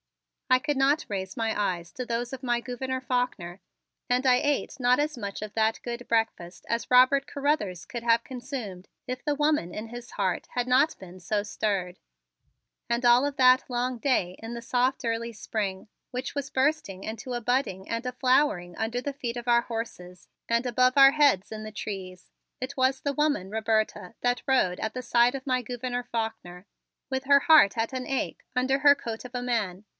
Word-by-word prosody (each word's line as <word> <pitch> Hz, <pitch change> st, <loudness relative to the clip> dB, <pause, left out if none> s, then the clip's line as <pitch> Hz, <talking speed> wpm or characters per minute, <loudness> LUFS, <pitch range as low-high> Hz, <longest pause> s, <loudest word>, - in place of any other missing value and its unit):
I 255 Hz, -, +6 dB
could 290 Hz, +2 st, -1 dB
not 275 Hz, +4 st, +2 dB
raise 190 Hz, -2 st, -4 dB
my 225 Hz, -2 st, -1 dB
eyes 175 Hz, -4 st, -2 dB
to 250 Hz, -, -5 dB
those 240 Hz, +1 st, -3 dB
of 265 Hz, 0 st, -7 dB
my 240 Hz, -1 st, +1 dB
Gouverneur 260 Hz, +1 st, -4 dB
Faulkner 245 Hz, -9 st, -2 dB, 0.5 s
and 250 Hz, +2 st, +1 dB
I 255 Hz, -1 st, +6 dB
ate 290 Hz, 0 st, -1 dB
not 250 Hz, +1 st, +4 dB
as 300 Hz, -1 st, -1 dB
much 200 Hz, -3 st, -5 dB
of 215 Hz, -1 st, -6 dB
that 220 Hz, 0 st, +1 dB
good 240 Hz, 0 st, -6 dB
breakfast 225 Hz, -6 st, -1 dB
as 230 Hz, +1 st, -2 dB
Robert 255 Hz, +2 st, +6 dB
Carruthers 275 Hz, -, -1 dB
could 235 Hz, -1 st, -6 dB
have 230 Hz, -1 st, +3 dB
consumed 245 Hz, -8 st, -7 dB, 0.2 s
if 255 Hz, +1 st, -5 dB
the 295 Hz, -2 st, 0 dB
woman 295 Hz, -, +1 dB
in 215 Hz, +2 st, -5 dB
his 240 Hz, 0 st, -9 dB
heart 185 Hz, -3 st, -1 dB
had 245 Hz, 0 st, 0 dB
not 265 Hz, +5 st, +3 dB
been 185 Hz, 0 st, -12 dB
so 205 Hz, +3 st, -1 dB
stirred. 200 Hz, -3 st, -2 dB, 0.9 s
And 235 Hz, +1 st, 0 dB
all 240 Hz, +3 st, +6 dB
of 285 Hz, -1 st, -3 dB
that 255 Hz, 0 st, +6 dB
long 250 Hz, 0 st, -1 dB
day 195 Hz, -9 st, +1 dB
in 225 Hz, +1 st, -7 dB
the 235 Hz, -, -6 dB
soft 250 Hz, +2 st, 0 dB
early 230 Hz, 0 st, -1 dB
spring 205 Hz, -3 st, -4 dB, 0.2 s
which 255 Hz, +3 st, -5 dB
was 280 Hz, -1 st, -3 dB
bursting 260 Hz, -9 st, 0 dB
into 225 Hz, +3 st, -5 dB
a 240 Hz, -, -1 dB
budding 240 Hz, -6 st, -1 dB
and 230 Hz, +2 st, -3 dB
a 250 Hz, -, -1 dB
flowering 250 Hz, -9 st, +1 dB
under 225 Hz, +2 st, -2 dB
the 280 Hz, +3 st, -4 dB
feet 245 Hz, -3 st, -4 dB
of 240 Hz, 0 st, -7 dB
our 235 Hz, 0 st, +5 dB
horses 180 Hz, -7 st, -7 dB, 0.2 s
and 235 Hz, +2 st, +1 dB
above 255 Hz, +2 st, +2 dB
our 270 Hz, 0 st, +9 dB
heads 280 Hz, -11 st, +3 dB
in 215 Hz, 0 st, -6 dB
the 215 Hz, -, -7 dB
trees, 190 Hz, -4 st, -7 dB, 0.3 s
it 260 Hz, +2 st, -5 dB
was 265 Hz, 0 st, +2 dB
the 285 Hz, -, -1 dB
woman 285 Hz, -10 st, 0 dB
Roberta 220 Hz, +1 st, -1 dB
that 245 Hz, 0 st, 0 dB
rode 215 Hz, -9 st, +2 dB
at 220 Hz, -, -2 dB
the 255 Hz, -, -3 dB
side 240 Hz, +2 st, +3 dB
of 270 Hz, 0 st, -7 dB
my 255 Hz, -1 st, +1 dB
Gouverneur 245 Hz, +1 st, -4 dB
Faulkner, 205 Hz, -6 st, -4 dB, 0.4 s
with 265 Hz, 0 st, -2 dB
her 280 Hz, 0 st, +6 dB
heart 285 Hz, -10 st, +6 dB
at 225 Hz, +3 st, -1 dB
an 255 Hz, -1 st, -3 dB
ache 270 Hz, -, -3 dB
under 260 Hz, +2 st, +1 dB
her 285 Hz, 0 st, +7 dB
coat 230 Hz, -5 st, -6 dB
of 250 Hz, 0 st, -10 dB
a 245 Hz, -, -2 dB
man. 215 Hz, -6 st, -2 dB
240 Hz, 195 wpm, -27 LUFS, 215-260 Hz, 0.9 s, our